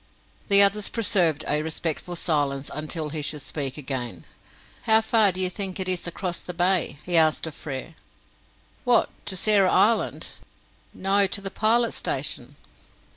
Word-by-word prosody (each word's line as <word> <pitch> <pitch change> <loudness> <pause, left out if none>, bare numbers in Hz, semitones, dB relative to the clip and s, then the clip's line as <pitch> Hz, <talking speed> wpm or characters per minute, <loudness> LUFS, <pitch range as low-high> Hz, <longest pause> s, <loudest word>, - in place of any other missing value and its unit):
The 200 -1 +7
others 200 +1 +3
preserved 175 -9 +1
a 150 +1 0
respectful 160 +2 -3
silence 145 -5 -1
until 155 0 -3
he 155 0 -3
should 150 -1 -3
speak 140 -2 -4
again. 125 - -6 0.6
"How 220 0 +5
far 220 -2 +3
do 185 - -5
you 185 - +4
think 195 0 -3
it 185 - -1
is 185 -1 0
across 175 0 -4
the 180 - -9
bay?" 180 -3 0
he 180 - -1
asked 160 0 +3
of 160 - -6
Frere. 145 +2 -7 0.9
"What, 245 -2 +3 0.2
to 190 - -2
Sarah 200 -2 +4
Island?" 225 +1 +2 0.7
"No, 195 +1 +2
to 200 - -2
the 195 -1 -6
Pilot 230 +3 +2
Station." - - -4
180 Hz, 155 wpm, -24 LUFS, 150-200 Hz, 0.9 s, The